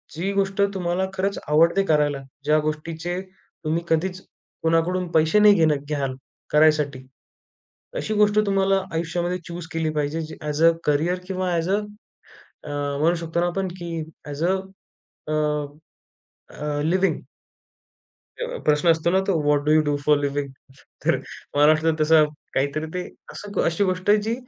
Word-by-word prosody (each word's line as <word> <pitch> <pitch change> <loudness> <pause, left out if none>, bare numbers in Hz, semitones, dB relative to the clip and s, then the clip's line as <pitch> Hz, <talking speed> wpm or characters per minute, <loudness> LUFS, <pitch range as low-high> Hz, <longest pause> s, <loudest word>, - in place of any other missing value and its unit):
जी 185 +5 -2
गोष्ट 195 0 0
तुम्हाला 180 0 0
खरंच 195 +1 -1
आवडते 165 +6 +4
करायला, 150 -3 +2 0.2
ज्या 155 +1 +4
गोष्टीचे 165 +3 -3
तुम्ही 165 -3 -5
कधीच 180 +3 0 0.4
कोणाकडून 165 +3 +1
पैसे 160 +6 +4
नाही 210 0 +8
घेणं 155 -4 +3
घ्याल, 140 -3 -2 0.4
करायसाठी 150 -4 +3 0.9
अशी 215 - -2
गोष्ट 210 0 +3
तुम्हाला 195 -1 +2
आयुष्यामध्ये 170 +2 -1
चुस 170 -1 -7
केली 160 -1 -1
पाहिजे. 150 +2 -1
जे 155 - -8
ॲझ 150 +1 -2
अ 165 - +8
करियर 160 +5 +1
किंवा 185 -1 -2
ॲझ 165 +2 -1
अ 200 - +3 0.9
अ 150 - -9 0.3
म्हणू 165 +3 +3
शकतो 165 0 -3
ना, 175 - +2
आपण 190 +2 -2
की 170 -2 -5 0.3
as 145 +2 -4
a 185 +2 +3 0.7
a 155 - -1 1.2
a 145 -1 -2
living. 185 +4 +1 1.2
अ, - - -3
प्रश्न 150 +3 +3
असतो 165 +1 +1
ना, 190 - +3
तो 185 -5 +2
what 145 -1 +2
do 150 - +3
you 155 0 +6
do 145 -1 0
for 150 -1 +5
living? 140 -1 -2 0.5
तर - - +3 0.4
महाराष्ट्रात 155 +2 +4
तसा 155 0 +6 0.3
काहीतरी 140 +4 0
ते 180 - -1 0.3
असं 205 0 -4
अशी 170 +4 +1
गोष्ट 185 +1 -2
आहे, 210 - +6
जी 225 +2 -1
165 Hz, 150 wpm, -23 LUFS, 150-185 Hz, 1.2 s, नाही